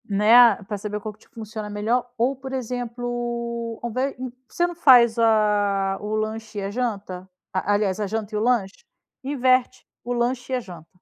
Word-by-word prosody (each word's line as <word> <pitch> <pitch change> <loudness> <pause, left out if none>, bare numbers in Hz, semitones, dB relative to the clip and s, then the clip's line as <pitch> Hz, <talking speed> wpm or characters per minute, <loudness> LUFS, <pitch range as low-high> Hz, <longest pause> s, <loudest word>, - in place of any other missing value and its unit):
Né, 210 +3 +4
a 235 -5 +7
pra 205 +1 -5
saber 210 +1 -4
qual 215 +1 -6
que 210 - -27
te - - -23
funciona 220 -3 -7
melhor 230 +4 -1
ou 250 +4 +1
por 265 0 -8
exemplo, 240 -1 -4
ao 240 - -2
invés 260 +4 -2
hum, 255 0 -4
por 255 +1 -39
que - - -24
você 345 0 +2
não 350 - -7
faz 245 -8 +6
a 205 -3 +2
o 210 +1 -3
lanche 215 0 -4
e - - -3
a 195 - -3
janta? 200 -6 -4 0.2
A 190 +2 0
aliás 205 -1 0
a 210 - -1
janta 215 +1 -4
e - - 0
o - - -1
lanche? 225 - 0 0.4
Inverte. 255 -2 +1 0.2
O 245 - -3
lanche 245 +2 -1
e - - +3
a - - 0
janta. 175 -8 -11
225 Hz, 215 wpm, -23 LUFS, 210-245 Hz, 0.4 s, a